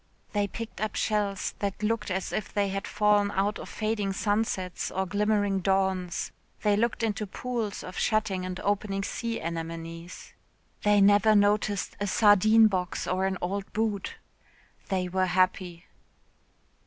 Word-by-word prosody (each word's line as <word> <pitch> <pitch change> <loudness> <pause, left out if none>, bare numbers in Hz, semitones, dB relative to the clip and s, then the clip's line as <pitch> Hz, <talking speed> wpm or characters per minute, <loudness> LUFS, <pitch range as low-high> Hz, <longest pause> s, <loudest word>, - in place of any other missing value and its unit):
They 205 -1 +1
picked 230 +2 -7
up 215 - -2
shells 205 -2 0
that 200 +1 -3
looked 220 -1 0
as 185 0 -2
if 215 - -3
they 200 -1 +1
had 195 +1 -3
fallen 210 -1 +3
out 200 +1 0
of - - -8
fading 215 -3 -1
sunsets 205 -3 -1
or 190 +1 -1
glimmering 205 0 +1
dawns 190 -2 0 0.3
they 210 -1 +4
looked 230 +2 0
into 215 -1 -1
pools 230 -1 -4
of 185 - -6
shutting 210 -4 +1
and 185 0 -4
opening 200 -1 -1
sea 230 +3 -3
anemones. 165 +1 -6 0.5
They 205 -1 +4
never 205 +2 +5
noticed 205 -1 +1
a 205 - -1
sardine 215 +2 +6
box 185 -4 0
or 185 +1 0
an 190 -1 -2
old 195 +2 -3
boot. 210 -3 -1 0.7
They 185 -2 0
were 185 +1 0
happy. 180 -1 0
200 Hz, 145 wpm, -28 LUFS, 185-210 Hz, 0.7 s, sardine